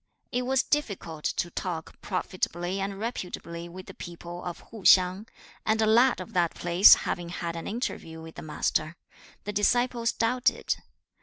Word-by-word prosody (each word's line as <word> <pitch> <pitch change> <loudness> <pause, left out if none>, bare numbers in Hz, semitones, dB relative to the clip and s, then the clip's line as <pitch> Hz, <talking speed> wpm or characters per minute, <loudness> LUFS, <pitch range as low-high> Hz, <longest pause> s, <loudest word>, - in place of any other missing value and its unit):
It 250 +1 -1
was 265 0 +3
difficult 190 - -2
to 175 - -1
talk 165 -3 -5
(profitably 185 -1 -2
and 195 0 -3
reputably) 175 -6 -5
with 185 +2 -9
the - - -10
people 175 0 -8
of 175 -1 -6
Hu 225 -2 -9
hsiang, 185 +3 +5 0.4
and 220 0 +1
a 220 - +4
lad 235 +3 +5
of 185 - -8
that 175 -2 +1
place 175 +3 +7
having 175 -2 -2
had 170 -1 -4
an 165 - -5
interview 200 -8 -4
with 160 0 -10
the - - -8
Master, 155 +1 -1 0.5
the 210 - -4
disciples 235 +3 +2
doubted. 245 +2 +1
185 Hz, 160 wpm, -28 LUFS, 170-225 Hz, 0.5 s, place